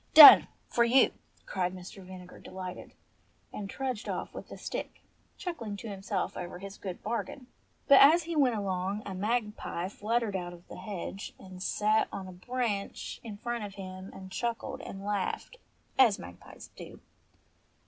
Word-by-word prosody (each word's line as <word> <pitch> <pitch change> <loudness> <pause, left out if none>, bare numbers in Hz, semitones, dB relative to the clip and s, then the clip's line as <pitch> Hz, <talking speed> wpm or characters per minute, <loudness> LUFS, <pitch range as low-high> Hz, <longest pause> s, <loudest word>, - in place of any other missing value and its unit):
"Done 305 -2 +13 0.2
for 235 - +3
you!" 250 +3 +5 0.3
cried 185 -1 -1
Mr. 185 +2 -10
Vinegar 180 -1 -11
delightedly; 185 -1 -8 0.6
and 200 -2 -5
trudged 255 -3 -3
off - - -4
with - - -8
the - - -8
stick, - - -6 0.3
chuckling 235 - -5
to 220 - -7
himself 195 -1 -3
over 180 0 -6
his 195 +2 -9
good 185 -3 -6
bargain. 235 +4 -3 0.4
But 280 -2 +9
as 320 +5 +8
he 335 0 -4
went 265 -6 +4
along 195 0 -2
a 195 - -5
magpie 210 -3 -2
fluttered 220 0 -1
out 175 -1 -3
of 175 0 -15
the - - -8
hedge 195 0 -6
and 185 -1 -11
sate 215 +3 +2
on 190 -1 -6
a - - -8
branch 210 +2 -3
in 215 -3 -7
front 240 +1 -3
of 205 -1 -7
him, 185 -1 -8
and 190 0 -10
chuckled 235 +3 -3
and 195 +1 -8
laughed 205 - -2 0.4
as 230 -7 +6
magpies 85 0 -11
do. - - -10
200 Hz, 160 wpm, -30 LUFS, 185-235 Hz, 0.6 s, Done